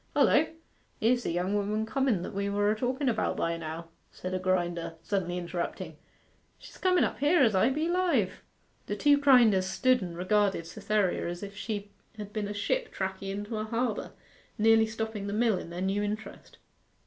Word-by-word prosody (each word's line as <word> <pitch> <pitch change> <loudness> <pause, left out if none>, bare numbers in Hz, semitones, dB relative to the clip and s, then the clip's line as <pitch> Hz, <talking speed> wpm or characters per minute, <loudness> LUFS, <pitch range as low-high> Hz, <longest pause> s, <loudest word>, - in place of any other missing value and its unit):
'Hullo! - - +4 0.5
Here's 240 +3 +3
the - - -3
young 180 +3 -1
woman 210 +1 0
comen 240 -6 0
that - - -6
we 200 +1 -1
were 205 +1 +2
a - - +1
talken 255 +5 -1
about 240 - 0
by 170 0 0
now,' 165 0 -6 0.2
said 185 0 -6
a 185 - 0
grinder, 175 -3 -1
suddenly 180 -2 -1
interrupting. 175 0 -4 0.6
'She's - - -14
comen 365 -1 +3
up - - -2
here, 295 +2 +4
as 225 -4 +4
I 190 +6 +4
be 305 +4 -1
alive!' 340 - +1 0.5
The - - -2
two 290 -1 +4
grinders 235 -9 +5
stood 255 +5 +2
and 175 -2 -6
regarded 195 -1 +1
Cytherea 205 0 -1
as 175 +2 -6
if 200 0 -7
she 205 0 -5 0.3
had 210 -1 -8
been 210 -2 -2
a 205 - -4
ship 475 - -1
tacking 190 0 -3
into 205 +3 -4
a 215 - -2
harbour, 230 0 -2 0.4
nearly 225 0 +5
stopping 220 -2 -4
the 200 - -3
mill 220 -3 +2
in - - -8
their 175 +1 -5
new 195 +2 0
interest. 210 +1 -6
205 Hz, 185 wpm, -29 LUFS, 185-230 Hz, 0.6 s, grinders